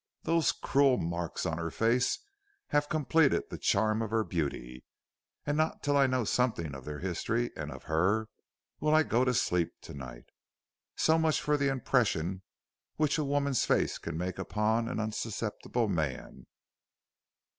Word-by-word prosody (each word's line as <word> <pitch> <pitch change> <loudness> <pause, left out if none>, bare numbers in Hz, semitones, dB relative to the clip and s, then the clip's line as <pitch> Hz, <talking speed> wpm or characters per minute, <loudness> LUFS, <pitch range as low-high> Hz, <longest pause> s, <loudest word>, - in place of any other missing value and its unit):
Those 165 -1 +2
cruel 135 -2 +3
marks 85 0 -3
on 80 +1 -1
her 85 0 -2
face 115 +7 +2 0.5
have 145 0 +1
completed 155 -1 +3
the - - -6
charm 110 0 +2
of 110 - -2
her 110 0 +1
beauty, 70 - -4 0.6
and 145 - 0
not 155 +1 0
till 145 -1 +1
I 140 -1 +5
know 130 -1 +1
something 110 - 0
of 65 -1 -9
their 75 0 -5
history 110 +7 -1
and - - -5
of - - -9
her, 95 +8 +1 0.5
will 155 0 +3
I 155 - +6
go 120 -3 +2
to 130 - +2
sleep 90 -5 +1
to - - -10
night. 60 -3 -9 0.7
So 160 +1 +3
much 160 -1 +2
for 150 - +1
the 140 -1 +1
impression 110 -9 0 0.5
which 155 0 +1
a - - +1
woman's 140 -2 +1
face - - +1
can 85 -1 -5
make 90 +1 -3
upon 110 +2 0
an - - -3
unsusceptible 110 +1 -2
man." 80 -9 -3
110 Hz, 160 wpm, -30 LUFS, 85-140 Hz, 0.7 s, I